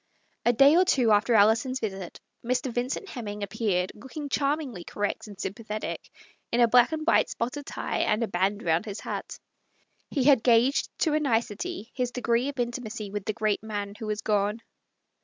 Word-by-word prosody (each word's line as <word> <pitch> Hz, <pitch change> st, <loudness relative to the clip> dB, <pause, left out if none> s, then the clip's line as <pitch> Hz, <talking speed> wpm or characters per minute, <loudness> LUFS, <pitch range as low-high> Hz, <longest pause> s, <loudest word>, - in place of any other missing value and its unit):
A -, -, +7 dB
day 275 Hz, +6 st, +6 dB
or 365 Hz, -, +6 dB
two 255 Hz, -11 st, +3 dB
after 220 Hz, +3 st, +4 dB
Alison's 220 Hz, +5 st, +4 dB
visit 195 Hz, -5 st, -5 dB, 0.2 s
Mr. 250 Hz, +1 st, -1 dB
Vin 245 Hz, +2 st, -1 dB
cent 400 Hz, -, -4 dB
Hemming 210 Hz, -, -6 dB
appeared, 195 Hz, -3 st, -1 dB
looking 265 Hz, +6 st, -8 dB
charmingly 275 Hz, -, -1 dB
correct 205 Hz, +3 st, -3 dB
and 200 Hz, -2 st, -12 dB
sympathetic, 215 Hz, +2 st, -5 dB, 0.4 s
in 235 Hz, -, +1 dB
a 240 Hz, -, +6 dB
black 245 Hz, +3 st, +5 dB
and 310 Hz, -1 st, -3 dB
white 340 Hz, -, +4 dB
spotted 270 Hz, +5 st, -4 dB
tie -, -, -3 dB
and 215 Hz, +2 st, +1 dB
a -, -, -1 dB
band 195 Hz, +2 st, 0 dB
round 165 Hz, 0 st, +1 dB
his 205 Hz, -1 st, -6 dB
hat. -, -, -5 dB, 0.7 s
He 275 Hz, -, 0 dB
had 270 Hz, -3 st, +6 dB
gauged 240 Hz, +3 st, +3 dB
to 315 Hz, -, +2 dB
a 305 Hz, -, +3 dB
nicety 240 Hz, -, -2 dB
his 250 Hz, -1 st, -1 dB
degree 245 Hz, +1 st, 0 dB
of 285 Hz, -, -7 dB
intimacy 230 Hz, -3 st, -3 dB
with 205 Hz, -1 st, -4 dB
the 215 Hz, -, -1 dB
great 215 Hz, 0 st, 0 dB
man 205 Hz, -2 st, -4 dB
who 220 Hz, -, -5 dB
was 210 Hz, 0 st, -2 dB
gone. 210 Hz, +2 st, 0 dB
230 Hz, 185 wpm, -27 LUFS, 210-255 Hz, 0.7 s, A